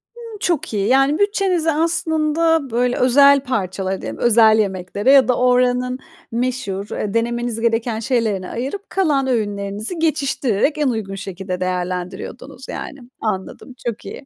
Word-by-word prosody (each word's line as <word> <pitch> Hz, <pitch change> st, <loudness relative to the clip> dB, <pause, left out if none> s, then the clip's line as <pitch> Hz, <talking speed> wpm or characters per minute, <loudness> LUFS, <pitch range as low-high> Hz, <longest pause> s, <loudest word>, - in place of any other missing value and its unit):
Imm, 460 Hz, -2 st, -10 dB
çok 340 Hz, -, -1 dB
iyi. 200 Hz, -1 st, 0 dB
Yani, 270 Hz, +4 st, +3 dB
bütçenizi 390 Hz, -5 st, +1 dB
aslında, 320 Hz, -1 st, +1 dB
böyle, 245 Hz, +1 st, +1 dB
özel 280 Hz, +3 st, +6 dB
parçalara 195 Hz, -6 st, -2 dB
diyelim, -, -, -6 dB
özel 220 Hz, -2 st, +5 dB
yemeklere 200 Hz, +3 st, 0 dB
ya 275 Hz, -2 st, +6 dB
da 250 Hz, -, +2 dB
oranın 250 Hz, 0 st, +2 dB, 0.3 s
meşhur, 235 Hz, -5 st, -2 dB
eee, 205 Hz, -1 st, -3 dB
denemeniz 235 Hz, 0 st, -1 dB
gereken 230 Hz, -1 st, 0 dB
şeylerine 220 Hz, -6 st, -1 dB
ayırıp 275 Hz, -, -5 dB
kalan 295 Hz, -8 st, +1 dB
öğünlerinizi 210 Hz, -, -2 dB
geçiştirerek 280 Hz, -4 st, 0 dB
en 300 Hz, -2 st, +1 dB
uygun 215 Hz, -5 st, -3 dB
şekilde 190 Hz, -1 st, -5 dB
değerlendiriyordunuz, 180 Hz, 0 st, -4 dB
yani. 285 Hz, -5 st, -6 dB, 0.2 s
Anladım, 215 Hz, +4 st, -4 dB
çok 235 Hz, -2 st, -4 dB
iyi. -, -, -8 dB
245 Hz, 135 wpm, -20 LUFS, 205-285 Hz, 0.3 s, özel